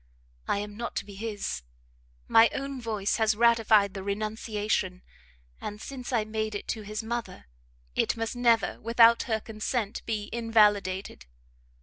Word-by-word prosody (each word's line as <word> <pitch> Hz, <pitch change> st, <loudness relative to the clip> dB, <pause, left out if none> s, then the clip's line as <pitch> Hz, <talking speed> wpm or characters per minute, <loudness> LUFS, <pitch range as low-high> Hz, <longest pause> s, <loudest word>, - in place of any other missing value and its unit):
I -, -, +1 dB
am 205 Hz, 0 st, -5 dB
not 235 Hz, 0 st, -5 dB
to -, -, -2 dB
be 205 Hz, -, -11 dB
his, 205 Hz, -, -4 dB, 0.7 s
my 225 Hz, +1 st, +6 dB
own 275 Hz, -2 st, -4 dB
voice 215 Hz, -3 st, -1 dB
has 220 Hz, -1 st, +2 dB
ratified 225 Hz, -3 st, +4 dB
the 195 Hz, -, -5 dB
renunciation, 210 Hz, -2 st, -2 dB, 0.6 s
and 210 Hz, 0 st, -6 dB
since 255 Hz, +1 st, -7 dB
I 225 Hz, -4 st, +1 dB
made 215 Hz, 0 st, -3 dB
it 205 Hz, -, -5 dB
to 220 Hz, -, -2 dB
his 215 Hz, +1 st, -5 dB
mother, 230 Hz, -, -5 dB, 0.5 s
it -, -, +1 dB
must 225 Hz, +1 st, -3 dB
never, 235 Hz, -3 st, +2 dB
without 230 Hz, 0 st, +5 dB
her 220 Hz, -1 st, +1 dB
consent, 220 Hz, 0 st, -3 dB
be 215 Hz, -2 st, -2 dB
invalidated. 210 Hz, -, +2 dB
220 Hz, 145 wpm, -28 LUFS, 205-230 Hz, 0.7 s, my